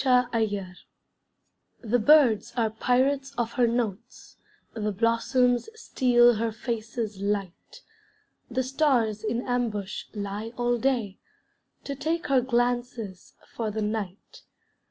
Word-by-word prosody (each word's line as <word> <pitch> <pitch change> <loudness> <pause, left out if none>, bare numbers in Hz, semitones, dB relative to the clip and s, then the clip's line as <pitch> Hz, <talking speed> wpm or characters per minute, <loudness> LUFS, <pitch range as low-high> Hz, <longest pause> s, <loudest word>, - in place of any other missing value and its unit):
JOY 250 -2 +5
SUPREME 210 -4 0 1.2
The 240 +2 +1
birds 255 -4 +4
are 225 -2 +1
pirates 270 +4 +1
of 235 -1 -1
her 245 -1 +2
notes, 230 0 -4 0.4
The 215 -2 -2
blossoms 235 - +1
steal 240 - +4
her 225 +1 -1
face's 220 -2 -4
light; 200 -3 -4 0.7
The 255 +1 -1
stars 255 -6 +1
in 230 +3 -1
ambush 225 -6 -2
lie 205 +3 -5
all 240 0 +1
day, 235 -7 -1 0.6
To 280 - -4
take 325 +4 -2
her 265 -2 +4
glances 240 -5 -2 0.2
for 225 -2 -2
the 215 +1 -3
night. 210 -3 -5
235 Hz, 115 wpm, -26 LUFS, 215-250 Hz, 1.2 s, JOY